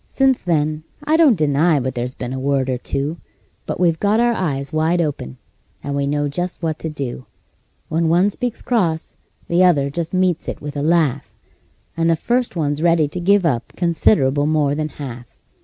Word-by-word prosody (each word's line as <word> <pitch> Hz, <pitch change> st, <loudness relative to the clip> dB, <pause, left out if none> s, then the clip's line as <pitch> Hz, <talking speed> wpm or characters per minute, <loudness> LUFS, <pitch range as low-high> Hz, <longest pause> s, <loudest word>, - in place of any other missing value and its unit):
Since 270 Hz, -2 st, +2 dB
then 155 Hz, -3 st, 0 dB, 0.2 s
I 305 Hz, +2 st, +2 dB
don't 305 Hz, -, +5 dB
deny 150 Hz, +1 st, +2 dB
but 130 Hz, 0 st, -2 dB
there's 125 Hz, +1 st, -4 dB
been 125 Hz, -, -5 dB
a 130 Hz, -, -4 dB
word 135 Hz, -1 st, 0 dB
or 125 Hz, -, -2 dB
two; 140 Hz, +6 st, -3 dB, 0.5 s
But -, -, -3 dB
we've 170 Hz, -3 st, +2 dB
got 210 Hz, +2 st, +2 dB
our 240 Hz, 0 st, +3 dB
eyes 145 Hz, -8 st, -3 dB
wide 160 Hz, +3 st, +1 dB
open, 140 Hz, -, -3 dB, 0.5 s
and 140 Hz, 0 st, -3 dB
know 145 Hz, 0 st, 0 dB
just 175 Hz, +5 st, -4 dB
what 160 Hz, -1 st, -1 dB
to 160 Hz, -, -4 dB
do: 135 Hz, -4 st, -6 dB, 0.6 s
When 165 Hz, +1 st, 0 dB
one 180 Hz, +5 st, +3 dB
speaks 245 Hz, +1 st, -4 dB
cross 175 Hz, -10 st, 0 dB, 0.3 s
the 175 Hz, +2 st, +3 dB
other 145 Hz, -6 st, +3 dB
just 165 Hz, +2 st, -3 dB
meets 185 Hz, -3 st, 0 dB
it -, -, -5 dB
with 145 Hz, 0 st, -7 dB
a 145 Hz, -, -2 dB
laugh, 150 Hz, -4 st, +1 dB, 0.6 s
And 165 Hz, 0 st, +1 dB
the 165 Hz, -, +4 dB
first 240 Hz, +8 st, -1 dB
one's 145 Hz, -2 st, -1 dB
ready 165 Hz, -3 st, +3 dB
to 180 Hz, -, -5 dB
give 195 Hz, +1 st, +3 dB
up 125 Hz, -7 st, -1 dB
considerable 150 Hz, -5 st, +2 dB
more 150 Hz, -2 st, +2 dB
than 155 Hz, +1 st, -2 dB
half. 125 Hz, -5 st, -9 dB
155 Hz, 190 wpm, -20 LUFS, 140-175 Hz, 0.6 s, don't